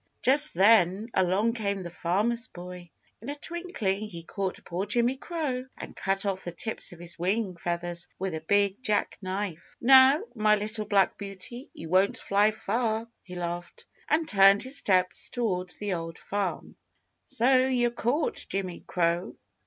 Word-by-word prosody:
Just 295 +4 +6
then 200 +1 +4
along 190 +5 +2
came 200 -4 -2
the 175 - -7
Farmer's 215 +8 0
Boy. 180 0 -10 0.3
In - - -7
a 290 - -3
twinkling, 300 - -3
he 185 -6 -7
caught 190 +2 -4
poor 185 +4 -3
Jimmy 240 +4 +2
Crow 270 -4 -3
and - - -9
cut 195 +1 -1
off 195 -1 -2
the 175 - -5
tips 220 +6 -1
of 175 - -11
his 170 -1 -6
wing 190 +2 -1
feathers 175 0 -3
with 190 -1 -3
a 160 - -4
big 200 +5 +1
jack 210 -5 0
knife. 185 -3 -5
"Now, 265 +3 +7
my 215 -2 +3
little 215 +1 -3
black 200 -2 +2
beauty, 200 +6 -8
you 165 - -8
won't 190 +3 +3
fly 205 +2 +2
far," 220 +1 -2
he 180 -1 -11
laughed, 175 0 -6 0.2
and 315 +1 +2
turned 195 0 +6
his 260 +2 -1
steps 185 -7 +1
toward 185 -7 -2
the 205 -2 -2
Old 165 -1 -5
Farm. 200 -2 -4 0.5
"So, 255 +2 +3
you're 245 -2 +1
caught, 245 +6 -1
Jimmy 190 -2 -3
Crow!" 170 0 0
200 Hz, 160 wpm, -27 LUFS, 180-235 Hz, 0.5 s, Now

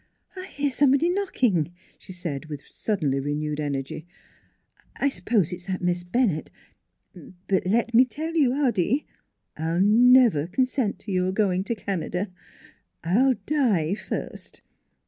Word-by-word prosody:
" - - -37
I 370 0 -7
hear 285 -5 -2
somebody 280 +5 +3
knocking," 240 - 0 0.2
she - - -11
said, 165 -6 -5
with 150 -2 -8
suddenly 150 -11 -1
renewed 150 +2 -3
energy. 145 +2 -4 0.4
" - - -37
I 280 - +1
suppose 210 - 0
it's 180 +1 -9
that 185 -1 -3
Miss 175 0 0
Bennett.... 175 -3 0 1.0
But 190 -2 +1
let 235 +4 +1
me 245 +3 +7
tell 310 +7 -5
you, 300 -6 +3
Hoddy, 265 - +1 0.5
I'll 165 +2 -1
never 225 - +5
consent 255 +2 0
to 205 - -7
you're 185 0 +1
going 190 -2 +1
to 235 - -2
Canada; 190 -1 -3 0.7
I'll 245 +10 +3
die 215 - +1
first. 210 - -6
195 Hz, 140 wpm, -25 LUFS, 170-255 Hz, 1.0 s, me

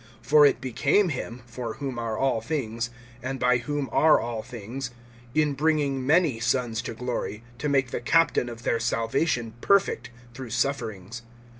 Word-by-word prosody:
(10)For 150 0 +7
it - - -3
became 140 - +2
him, 125 -4 -5
for 120 -1 -6
whom 135 -4 -4
are 115 -2 -2
all 130 -4 +1
things, 115 -6 -2 0.3
and 130 +2 -4
by 125 0 +4
whom 145 +3 -2
are 155 0 +5
all 115 -2 -3
things, 120 +4 -6 0.5
in 150 -2 +3
bringing 140 -3 +1
many 155 -6 +3
sons 120 -1 0
to 115 - -6
glory, 120 -2 -4 0.2
to 150 - -1
make 135 -3 +2
the - - -3
captain 165 -2 +3
of 120 0 -9
their 115 - +1
salvation 115 +1 0
perfect 190 - +2 0.2
through 130 -1 -7
sufferings. 115 -3 -2
125 Hz, 160 wpm, -26 LUFS, 115-140 Hz, 0.5 s, 10)For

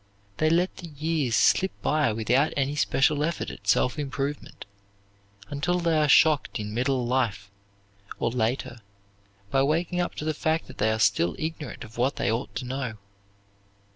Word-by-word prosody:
They 155 - +2
let 175 +3 +1
the 175 - -8
years 150 -5 -1
slip 190 0 +3
by 150 -6 +2
without 120 +7 +1
any 140 +1 0
special 145 0 +2
effort 165 +2 -2
at - - -13
self 125 - +2
improvement, 145 0 -4 0.9
until 170 +5 0
they 170 -2 +1
are 150 -1 +2
shocked 150 -3 +4
in 105 0 -5
middle 125 +1 0
life, 115 -6 -1 0.7
or 115 - -1
later, 120 0 -2 0.7
by 135 - +3
waking 165 +5 +1
up 175 - -3
to 150 - -5
the 155 - 0
fact 160 +2 0
that - - -14
they 110 +1 +2
are 110 - 0
still 100 -5 +2
ignorant 160 -3 -5
of 115 0 -11
what 130 +3 +1
they 100 - 0
ought 115 +4 -3
to 130 - -4
know. 125 -3 -4
140 Hz, 170 wpm, -26 LUFS, 120-155 Hz, 0.9 s, shocked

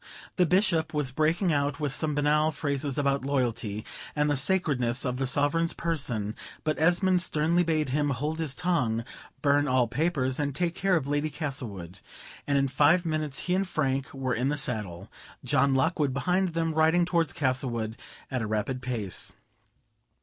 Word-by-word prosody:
The 180 -2 +3
Bishop 180 -4 +2
was 145 -4 +1
breaking 160 +5 +1
out 140 0 0
with 145 -3 -1
some 150 0 0
banale 150 +2 +2
phrases 140 -2 -2
about 140 -2 +1
loyalty, 120 -6 -1 0.3
and 150 0 +2
the - - +2
sacredness 135 -6 +1
of 125 -1 -1
the 135 0 -1
Sovereign's 145 +5 +1
person; 125 -11 -2 0.3
but 155 -1 -1
Esmond 180 +2 +3
sternly 170 0 +2
bade 155 -4 0
him 145 +2 +1
hold 150 +4 -2
his 150 -4 -1
tongue, 125 -11 0 0.4
burn 145 0 +3
all 130 -2 +3
papers, 135 -1 0
and 140 -2 -1
take 170 +2 0
care 190 +1 +1
of 155 -6 0
Lady 145 +2 0
Castlewood; 120 - -4 0.5
and 140 -1 +2
in 135 0 +2
five 150 +7 +3
minutes 155 -3 -2
he 180 - 0
and 190 +1 +1
Frank 135 -5 -1
were 130 -2 -2
in 125 +4 0
the 150 - -1
saddle, 105 - -2 0.4
John 140 0 +3
Lockwood 150 -2 +1
behind 180 +4 0
them, 165 -1 0
riding 160 +3 +3
towards 170 -2 +1
Castlewood 125 -6 -1 0.4
at 130 -2 -1
a 110 - -2
rapid 110 +4 -2
pace. 115 -8 -2
145 Hz, 170 wpm, -27 LUFS, 130-160 Hz, 0.5 s, The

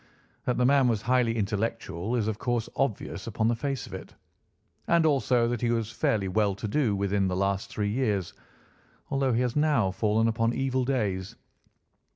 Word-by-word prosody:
That 125 - 0
the 125 - +3
man 135 0 +4
was 115 -2 0
highly 125 -2 +2
intellectual 105 -1 -2
is 110 -3 0
of 110 -1 -2
course 120 -2 -1
obvious 110 -5 -2
upon 110 0 0
the 120 - +1
face 135 +1 -3
of - - -12
it, - - -9 0.7
and 170 -1 +4
also 130 -5 +3
that 120 -1 -2
he 120 - +1
was 115 -2 -1
fairly 105 -3 0
well 100 +1 +1
to 105 +2 -5
do 115 -3 +1
within 100 0 +1
the 90 - -1
last 100 +1 -1
three 105 -1 -2
years, 105 -6 -1 0.8
although 135 -1 +1
he 115 - +2
has 125 -2 -1
now 145 -10 +2
fallen 110 +3 +1
upon 115 +1 +1
evil 130 -1 0
days. 100 -8 -1
115 Hz, 185 wpm, -27 LUFS, 100-125 Hz, 0.8 s, man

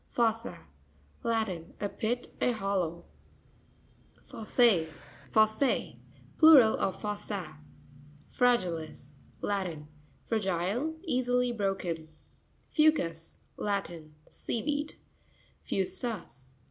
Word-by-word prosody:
Fo'ssa.—Latin. 175 - -3
A 205 - 0
pit, 235 +4 -3
a 250 - +3
hollow. 190 -5 -2 1.2
Fos's.z.—Plural 220 - +3
of 190 - -1
fossa. 200 -6 -5 0.7
Fra'ainis.—Latin. 170 - -1 0.2
— - - -33
Fragile; 210 - 0
easily 250 -5 +1
broken. 190 -7 -2 0.6
Fou'cus.—Latin. 175 - 0 0.2
Sea 230 - -3
weed. 295 +1 -1 0.7
Fu'sus. 190 - -3
200 Hz, 60 wpm, -30 LUFS, 165-240 Hz, 1.2 s, a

